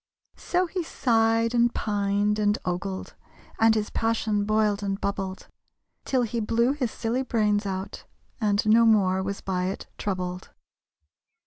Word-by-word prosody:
So 360 +1 0
he 360 +1 -3
sighed, 230 -6 +1
and 240 0 +3
pined, 205 0 0
and 210 0 +2
ogled, 185 +2 -4 0.5
And 225 0 +5
his 210 -1 -2
passion 220 -2 0
boiled, 215 -1 +1
and 195 -1 -2
bubbled, 195 -1 -4 0.6
Till 260 -2 +1
he 235 0 -2
blew 230 +3 +2
his 275 -4 -1
silly 230 +4 -2
brains 210 -5 +1
out, 190 0 -5 0.3
And 210 -2 +1
no 230 +2 +6
more 190 -4 +3
was 200 +1 -4
by 180 -1 -2
it 190 +2 -4
troubled. 185 -2 -3
210 Hz, 140 wpm, -26 LUFS, 200-230 Hz, 0.6 s, no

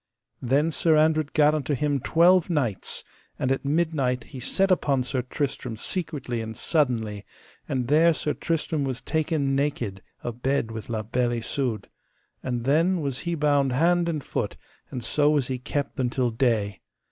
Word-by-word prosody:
Then 140 +6 +2
Sir 160 0 +3
Andred 155 -1 +3
gat 150 0 +4
unto 150 -1 -1
him 145 0 0
twelve 175 +6 +4
knights, 130 - -1 0.3
and 130 - 0
at 135 - 0
midnight 140 -5 0
he 135 - -10
set 195 +9 +1
upon 140 -7 +2
Sir 125 0 -1
Tristram 125 -2 -3
secretly 140 - -3
and 110 -1 -6
suddenly 115 -10 0 0.5
and 125 -2 -1
there 160 +5 +5
Sir 150 -2 -1
Tristram 160 -2 -1
was 130 -2 -2
taken 155 -3 0
naked 125 -9 -1 0.2
abed 120 0 -1
with 110 0 -7
La 110 -2 -2
Beale 120 +2 0
Isoud, 115 -2 -2 0.5
and 120 -2 -3
then 165 +7 +3
was 140 -3 -2
he 170 - 0
bound 145 -4 +2
hand 170 +5 +3
and 155 -4 -2
foot, - - -3 0.3
and 125 - -5
so 145 +5 +3
was 145 -4 +1
he 130 -1 -2
kept 140 +3 -3
until 125 -1 0
day. 110 -5 0
135 Hz, 160 wpm, -25 LUFS, 120-155 Hz, 0.5 s, there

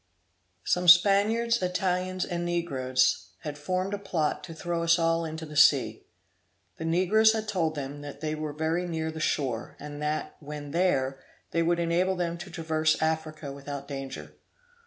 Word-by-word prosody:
Some 180 0 0
Spaniards, 205 +6 +5
Italians, 185 0 -1
and 175 -1 -3
negroes, 140 -7 0
had 150 -2 -5
formed 185 +6 -2
a 205 - -2
plot 165 -6 -1
to 165 - -9
throw 170 0 -2
us 170 +1 +4
all 165 0 +1
into 160 0 -5
the 150 0 -10
sea. 130 -6 +4 0.7
The 160 - -5
negroes 190 +7 +4
had 220 -1 -3
told 165 -7 0
them 145 0 -5
that 145 -1 -8
they 155 0 -2
were 155 -1 -4
very 160 +4 -1
near 160 -1 -2
the 160 - -7
shore, 130 -7 -1
and 145 0 -8
that, 150 +1 -2
when 145 -1 -7
there, 135 -6 +1 0.3
they 165 - +1
would 170 +1 +2
enable 175 +3 +1
them 170 -1 -2
to 190 - -8
traverse 160 -2 0
Africa 160 -2 -2
without 140 0 -7
danger. 135 -2 -7
165 Hz, 165 wpm, -28 LUFS, 150-180 Hz, 0.7 s, Spaniards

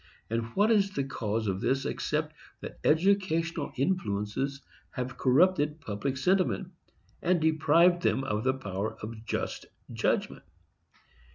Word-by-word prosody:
And 115 0 -1
what 210 +3 +4
is 200 -3 +4
the 140 -8 -2
cause 110 -4 -2
of 95 -1 -2
this, 135 +1 0
except 150 +1 -2 0.3
that - - -8
educational 165 -2 +2
influences 135 - -1 0.3
have 125 -1 -4
corrupted 150 +3 +3
public 130 +2 -3
sentiment, 185 +4 +1 0.5
and 180 0 +2
deprived 160 +3 +4
them 135 - +1
of 105 -4 -2
the 130 0 +2
power 105 -3 -4
of 110 0 -8
just - - -3 0.3
judgment? - - 0
140 Hz, 125 wpm, -29 LUFS, 115-175 Hz, 0.5 s, what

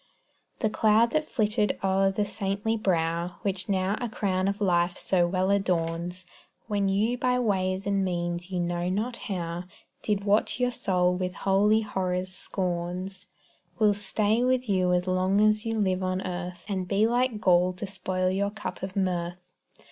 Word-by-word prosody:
The 220 - +2
cloud 220 +2 +4
that 310 +1 0
flitted 210 -2 +1
o'er 195 0 +3
the 205 +2 0
saintly 205 +1 -1
brow 170 -4 0
Which 190 -2 -2
now 190 +1 +1
a 240 - -2
crown 190 -4 0
of 200 +1 -1
life 175 -2 +2
so 175 -2 +2
well 185 +2 +1
adorns, 180 -2 -1 0.4
When 205 -3 0
you 220 +5 +1
by 250 0 +2
ways 190 -5 0
and 200 -1 +1
means 175 -1 -2
you 185 -2 -2
know 175 0 -1
not 220 +6 -2
now, 175 -2 -3 0.4
Did 205 -2 -1
what 205 +4 +1
your 250 0 +2
soul 180 -5 +1
with 180 0 -3
holy 205 +3 +4
horror 185 -3 -1
scorns, 185 0 -4 0.5
Will 210 0 +4
stay 210 +3 +1
with 255 0 +1
you 185 -3 +2
long 185 +2 +2
as 215 +1 +3
you 225 0 -1
live 190 -2 +1
on 185 0 -1
earth, 180 -1 -5
And 190 -3 -2
be 200 +4 +3
like 240 -1 +1
gall 180 -3 +4
to 180 +3 -5
spoil 185 -1 -1
your 200 +2 0
cup 210 0 -6
of 190 0 -5
mirth. 180 -1 -2
190 Hz, 165 wpm, -27 LUFS, 180-210 Hz, 0.5 s, cloud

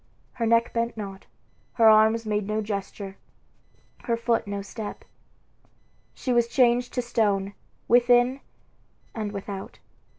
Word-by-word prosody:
Her 230 -2 -1
neck 230 +1 +2
bent 230 0 -1
not, 195 -2 -7 0.5
her 225 -2 +4
arms 220 +1 +5
made 210 -2 -1
no 215 +1 -1
gesture, 200 -1 -5 0.9
her 235 -2 0
foot 230 -2 0
no 200 0 -4
step. 205 +1 -7 1.1
She 255 - -2
was 235 -1 +3
changed 245 -1 +2
to 250 - 0
stone, 200 -4 0 0.3
within 245 +2 +4 0.7
and 215 -2 -4
without. 200 -1 -7
225 Hz, 125 wpm, -25 LUFS, 205-235 Hz, 1.1 s, arms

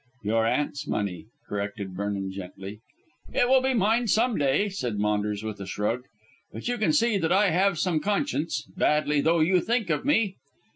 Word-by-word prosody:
"Your 110 +2 +1
aunt's 145 +4 -1
money," 100 -2 -3 0.2
corrected 100 -1 -4
Vernon 100 0 -3
gently. 95 +2 -8 0.6
"It 245 - +3
will 260 +1 +5
be 265 0 +1
mine 225 +3 +2
some 225 +3 +2
day," 145 +7 +2
said 125 - -3
Maunders 105 0 -1
with 110 -2 -5
a 100 - -6
shrug; 115 +6 -2 0.5
"but 115 - -7
you 245 -1 -1
can 215 - +2
see 235 -8 +2
that 165 -2 0
I 195 0 +4
have 190 +2 +2
some 170 -1 +1
conscience, 200 - -1
badly 150 -1 +2
though 165 +2 +3
you 180 +3 +3
think 230 -6 0
of 150 - 0
me." 225 -9 +1
150 Hz, 180 wpm, -26 LUFS, -, 0.6 s, will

